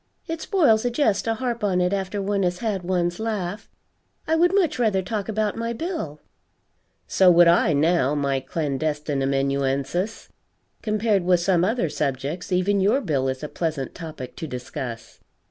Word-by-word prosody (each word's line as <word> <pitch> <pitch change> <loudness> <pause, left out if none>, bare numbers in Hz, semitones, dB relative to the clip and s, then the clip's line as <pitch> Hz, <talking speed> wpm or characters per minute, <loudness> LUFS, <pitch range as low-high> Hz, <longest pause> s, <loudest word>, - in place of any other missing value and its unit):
It 325 0 -4
spoils 285 - +3
a 245 - +1
jest 235 -5 +1
to 225 0 0
harp 235 -1 -3
on 190 -3 +2
it 180 +1 +1
after 195 +1 -2
one 200 0 0
has 180 -1 0
had 210 -3 -2
one's 175 0 -1
laugh. 210 -2 -3 0.6
I 320 - +2
would 350 +2 +4
much 375 -9 +1
rather 210 -5 +2
talk 205 +2 -3
about 215 -1 0
my 230 +1 -2
bill." 235 - -4 0.9
"So 190 -1 +4
would 175 0 +7
I, 170 -1 +4
now, 150 -1 +2
my 140 -2 0
clandestine 145 0 -2
amanuensis. 140 +8 -1 0.5
Compared 215 -3 +1
with 180 0 +3
some 175 -1 +2
other 225 0 +1
subjects, 145 +4 -3
even 190 +2 +2
your 205 +8 +3
bill 145 - -1
is 130 +2 -3
a - - -2
pleasant 155 -5 -3
topic 155 -7 -8
to 160 - -5
discuss." 125 -2 -7
180 Hz, 165 wpm, -24 LUFS, 150-215 Hz, 0.9 s, would